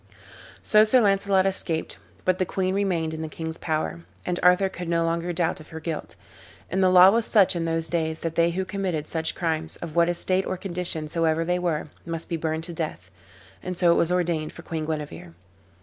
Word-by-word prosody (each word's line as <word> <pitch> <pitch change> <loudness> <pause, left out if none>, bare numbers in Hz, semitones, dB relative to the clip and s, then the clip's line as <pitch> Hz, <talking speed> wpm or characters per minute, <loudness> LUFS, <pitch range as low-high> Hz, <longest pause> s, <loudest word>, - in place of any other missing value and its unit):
So 215 -1 +6
Sir 220 +4 +5
Launcelot 195 -3 +3
escaped, 175 -4 -2 0.3
but 185 0 +2
the - - +3
queen 185 -1 -1
remained 180 -5 0
in 160 - -5
the 160 - -4
king's 160 +1 -6
power, 160 +1 -2 0.2
and 180 0 -1
Arthur 180 +2 +5
could 180 -2 -6
no 165 -1 +2
longer 170 +1 -1
doubt 170 0 0
of 155 - -13
her 160 - -7
guilt. 160 -1 -5 0.6
And 190 +2 +1
the 185 - +5
law 185 +1 +8
was 230 +1 +1
such 195 -4 +4
in 170 -1 -1
those 165 0 -1
days 160 -2 -2
that 165 -1 -2
they 170 0 +3
who 185 +2 -2
committed 185 -5 -2
such 160 0 -2
crimes, 160 -2 -2
of 170 -2 -8
what 170 0 +4
estate 185 +2 0
or 185 - -2
condition 175 -4 -2
soever 165 0 0
they 180 +1 0
were, 165 -4 -1
must 165 -1 -5
be 170 - -1
burned 160 0 -2
to 170 0 -6
death, 150 - -5 0.5
and 180 -1 -5
so 175 -1 +4
it - - +4
was 170 - +2
ordained 170 -4 0
for 170 - -11
Queen 160 -3 -4
Guenever. 150 - -5
170 Hz, 210 wpm, -25 LUFS, 160-185 Hz, 0.6 s, law